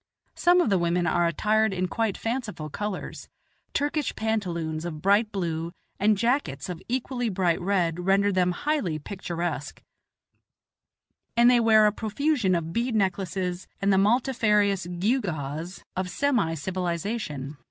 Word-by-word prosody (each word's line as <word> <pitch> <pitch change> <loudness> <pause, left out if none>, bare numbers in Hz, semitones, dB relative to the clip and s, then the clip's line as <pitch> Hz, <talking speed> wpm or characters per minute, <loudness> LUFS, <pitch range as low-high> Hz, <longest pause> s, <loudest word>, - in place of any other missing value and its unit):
Some 355 +1 +4
of 225 - +1
the 190 - +3
women 170 +1 +1
are 175 0 +2
attired 215 +6 +2
in 185 0 0
quite 220 +1 -1
fanciful 225 - -4
colors; 205 +1 -5 0.4
Turkish 290 0 -1
pantaloons 170 -8 -2
of 165 -3 -5
bright 205 +5 +3
blue 170 -3 -3 0.3
and 210 +1 +3
jackets 230 - 0
of 180 -1 -5
equally 245 -1 -1
bright 180 -4 +1
red 175 -3 0
render 195 +3 +3
them 180 -1 +2
highly 200 - -1
picturesque, 170 -3 -5 1.5
and 240 +1 +7
they 245 - +5
wear 220 -2 +6
a 210 - +4
profusion 220 - 0
of 165 -1 -3
bead 235 0 0
necklaces 190 -2 -1
and 200 0 +2
the 190 - +4
multifarious 210 -4 +2
gewgaws 175 - -2
of 185 0 -2
semi 220 - +1
civilization. 170 - -3
195 Hz, 135 wpm, -26 LUFS, 170-225 Hz, 1.5 s, and